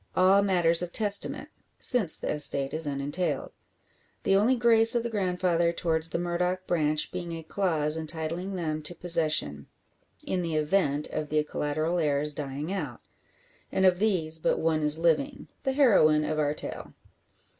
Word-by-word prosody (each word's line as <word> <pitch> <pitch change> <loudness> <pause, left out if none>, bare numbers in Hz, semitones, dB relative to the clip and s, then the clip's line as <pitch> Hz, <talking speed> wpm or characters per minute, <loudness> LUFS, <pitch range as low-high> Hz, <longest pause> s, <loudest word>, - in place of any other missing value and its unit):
All 190 +2 +4
matters 175 -4 +2
of 175 -1 -5
testament, 205 -1 -1 0.3
since 225 -10 +5
the - - -4
estate 140 -2 +2
is 160 -1 +1
unentailed; 145 +5 -3 0.7
the 195 - +2
only 220 +6 +3
grace 230 -1 +5
of 235 - 0
the 235 - -4
grandfather 180 -4 0
towards 165 -1 -1
the 165 - -3
Murdock 180 +2 -2
branch 155 -3 -1
being 175 -2 -6
a 165 -1 -7
clause 160 -3 -1
entitling 165 +4 -5
them 155 -3 -3
to 155 +3 -6
possession, 155 - -1 0.6
in 185 - -3
the 165 -2 -3
event 150 -2 0
of 150 -1 -4
the 150 0 0
collateral 155 +3 -3
heirs 150 -1 +1
dying 145 +4 -5
out. 150 -11 -6 0.7
And 190 - +1
of 180 -1 +3
these 170 -7 +1
but - - 0
one 160 -1 0
is 150 0 +5
living 170 - -1
the 265 - -2
heroine 190 - +3
of 155 0 -3
our 150 0 0
tale. - - -8
165 Hz, 160 wpm, -26 LUFS, 155-185 Hz, 0.7 s, since